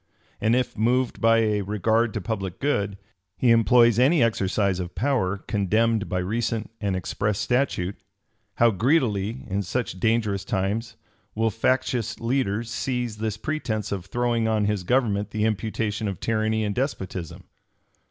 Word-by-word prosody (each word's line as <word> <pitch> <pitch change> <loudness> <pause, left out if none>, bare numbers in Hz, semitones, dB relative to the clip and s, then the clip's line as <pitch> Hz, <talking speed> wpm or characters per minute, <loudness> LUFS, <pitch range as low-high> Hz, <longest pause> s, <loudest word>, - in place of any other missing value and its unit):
And 110 +2 +3
if, 125 -1 -1
moved 120 +3 +1
by 115 0 +5
a 105 -2 +1
regard 110 +3 +1
to 105 - -2
public 95 -4 -4
good, 100 -8 0 0.4
he 125 - +3
employs 115 +1 +5
any 140 +2 +5
exercise 100 -3 +1
of 90 -1 -5
power 120 -8 0
condemned 110 +3 0
by 90 - -1
recent 110 +4 -2
and 100 -3 0
express 100 +3 -1
statute, 120 -8 0 0.6
how 120 -1 +4
greedily, 115 - +1
in 100 +1 -1
such 100 0 -3
dangerous 110 -3 +1
times, 105 +5 -2 0.4
will 110 +1 +1
factious 120 0 0
leaders 115 -2 -1
seize 125 -3 -2
this 110 -1 -2
pretence 110 -5 -3
of 95 -2 -4
throwing 120 0 0
on 110 -2 +1
his 105 -2 0
government 105 -1 +1
the 110 0 -1
imputation 110 0 -1
of 100 -3 -4
tyranny 110 0 0
and 105 -1 -1
despotism! 95 - -4
110 Hz, 145 wpm, -25 LUFS, 100-120 Hz, 0.6 s, by